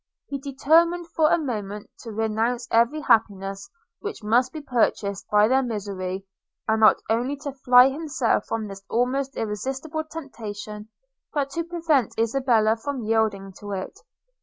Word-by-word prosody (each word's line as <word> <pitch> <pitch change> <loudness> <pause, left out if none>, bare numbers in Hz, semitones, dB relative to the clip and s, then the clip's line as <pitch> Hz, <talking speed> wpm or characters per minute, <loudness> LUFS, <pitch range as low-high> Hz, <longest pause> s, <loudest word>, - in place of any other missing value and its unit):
He 280 - -3
determined 330 +6 +2
for 310 -1 +3
a - - +4
moment 210 -9 -4
to 230 - -8
renounce 225 +3 -1
every 235 +7 +3
happiness 195 -6 +1 0.3
which 420 - -6
must 235 +4 +3
be 315 - -6
purchased 220 -7 0
by 210 0 +5
their 260 +3 +3
misery, 195 -5 -4 0.4
and 220 0 +2
not 215 -1 +7
only 240 +6 0
to 285 - -3
fly 250 -1 +6
himself 275 -4 0
from 220 -2 -2
this 195 -1 -9
almost 265 +3 0
irresistible 265 +9 -3
temptation, 215 -9 -8 0.4
but 280 -2 -1
to 335 +4 -2
prevent 325 - 0
Isabella 230 -2 +2
from 260 +1 -4
yielding 215 -3 0
to 205 -1 -6
it. 190 -1 -5
235 Hz, 145 wpm, -24 LUFS, 210-275 Hz, 0.4 s, not